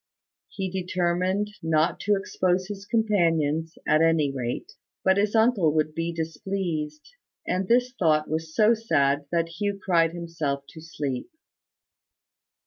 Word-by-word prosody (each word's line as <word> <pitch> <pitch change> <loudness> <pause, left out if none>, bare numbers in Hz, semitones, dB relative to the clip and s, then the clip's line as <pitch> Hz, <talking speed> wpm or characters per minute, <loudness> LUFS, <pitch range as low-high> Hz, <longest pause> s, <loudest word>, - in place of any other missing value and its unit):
He 190 -2 -4
determined 185 +2 0
not 160 +1 +1
to 205 0 +2
expose 185 -1 0
his 200 -1 -7
companions, 165 -8 +1
at 155 +1 +4
any 165 -3 +3
rate: 125 -3 -4 0.3
but 190 0 +4
his 205 +2 +1
uncle 220 -9 +3
would 155 0 +1
be 165 +1 -2
displeased; 160 -1 -4 0.4
and 185 +1 -1
this 245 +3 +3
thought 155 -4 +3
was 160 +1 -4
so 215 +1 +5
sad 145 -11 +1
that 165 -1 +1
Hugh 205 -1 -1
cried 165 -4 +2
himself 160 -5 -3
to 160 - -11
sleep. 145 - -4
170 Hz, 135 wpm, -26 LUFS, 155-195 Hz, 0.4 s, so